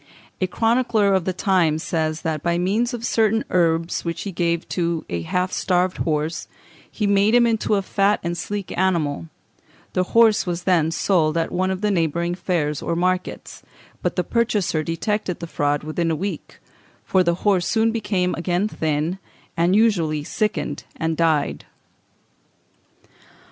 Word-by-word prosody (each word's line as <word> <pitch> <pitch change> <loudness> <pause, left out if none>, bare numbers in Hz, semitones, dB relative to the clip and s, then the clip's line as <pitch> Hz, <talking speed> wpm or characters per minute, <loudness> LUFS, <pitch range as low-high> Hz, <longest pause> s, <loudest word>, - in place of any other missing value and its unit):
A 185 - +2
chronicler 225 -1 +2
of 190 -3 +1
the 185 - 0
time 180 -4 +2
says, 160 0 -2
that 160 -3 -2
by 170 +1 0
means 210 +8 +1
of 240 -2 -4
certain 225 -1 +2
herbs 165 -1 +1
which 170 -1 -3
he 200 - -4
gave 170 -1 -1
to 170 -2 -1
a 85 -1 -2
half 180 - -1
starved 180 0 0
horse, 155 0 -2 0.4
he 210 - -2
made 200 +3 +3
him 240 -1 +6
into 220 -2 +1
a 195 - 0
fat 200 +2 +2
and 170 0 -2
sleek 195 +1 -4
animal; 155 - 0 0.7
the 185 - +1
horse 220 -4 +5
was 175 0 -2
then 170 -4 +3
sold 165 -2 +1
at 165 - -1
one 185 +1 0
of 190 0 -3
the 210 -1 +1
neighbouring 170 -1 0
fairs 160 -5 -1
or 170 - -2
markets, 180 +1 -2 0.4
but - - -1
the - - +1
purchaser 215 -9 0
detected 180 +3 -2
the 170 - -5
fraud 145 -3 -1
within 165 +2 -1
a 160 - +1
week, 180 0 -5 0.5
for 185 - +3
the 170 -1 +1
horse 195 -4 +3
soon 225 0 +2
became 195 -5 -1
thin - - -4 0.3
again, 155 +4 -1 0.4
and 170 +3 +2
usually 170 -9 +2
sickened 150 -6 -2
and 165 0 -1
died. 160 -3 +1
180 Hz, 160 wpm, -22 LUFS, 165-200 Hz, 0.7 s, him